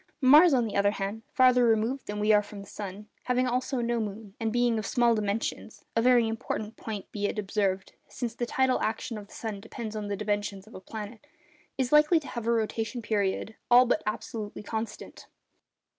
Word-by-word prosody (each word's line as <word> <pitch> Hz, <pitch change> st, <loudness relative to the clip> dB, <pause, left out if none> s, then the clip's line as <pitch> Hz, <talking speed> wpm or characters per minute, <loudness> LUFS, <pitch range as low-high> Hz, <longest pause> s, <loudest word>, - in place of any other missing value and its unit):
Mars, 300 Hz, +6 st, +7 dB
on 250 Hz, -4 st, +3 dB
the 215 Hz, -, -5 dB
other 200 Hz, 0 st, +4 dB
hand, 205 Hz, +2 st, -4 dB
farther 255 Hz, -2 st, +5 dB
removed 230 Hz, +3 st, +1 dB
than 210 Hz, 0 st, -4 dB
we 210 Hz, +1 st, +3 dB
are 210 Hz, -, +6 dB
from 205 Hz, 0 st, -10 dB
the -, -, -10 dB
sun, 205 Hz, +1 st, -7 dB, 0.2 s
having 250 Hz, 0 st, +2 dB
also 255 Hz, +1 st, -1 dB
no 235 Hz, 0 st, 0 dB
moon, 210 Hz, -1 st, -5 dB
and 225 Hz, -1 st, -1 dB
being 240 Hz, -1 st, +2 dB
of 215 Hz, -, -5 dB
small 240 Hz, -1 st, +3 dB
dimensions 215 Hz, +1 st, -3 dB
(a 230 Hz, -, +3 dB
very 240 Hz, -1 st, +5 dB
important 225 Hz, -1 st, -4 dB
point, 210 Hz, -3 st, -7 dB
be 205 Hz, -1 st, -1 dB
it -, -, -4 dB
observed, 195 Hz, -2 st, -1 dB
since 235 Hz, -3 st, -4 dB
the 240 Hz, +1 st, -3 dB
tidal 260 Hz, 0 st, +1 dB
action 225 Hz, +2 st, -2 dB
of 205 Hz, -1 st, -8 dB
the -, -, -17 dB
sun 215 Hz, -3 st, -5 dB
depends 225 Hz, 0 st, -7 dB
on 210 Hz, -1 st, -4 dB
the 200 Hz, -1 st, -2 dB
dimensions 205 Hz, -1 st, -2 dB
of 220 Hz, -, -16 dB
a -, -, -8 dB
planet), 220 Hz, +6 st, -8 dB, 0.5 s
is 260 Hz, -2 st, 0 dB
likely 300 Hz, +3 st, +6 dB
to 295 Hz, -, -10 dB
have 235 Hz, -2 st, -5 dB
a -, -, +3 dB
rotation 225 Hz, +1 st, -1 dB
period 205 Hz, 0 st, -1 dB, 0.2 s
all 250 Hz, +1 st, +8 dB
but 240 Hz, -, +1 dB
absolutely 215 Hz, -1 st, -4 dB
constant. 220 Hz, +1 st, -6 dB
225 Hz, 205 wpm, -28 LUFS, 210-245 Hz, 0.5 s, all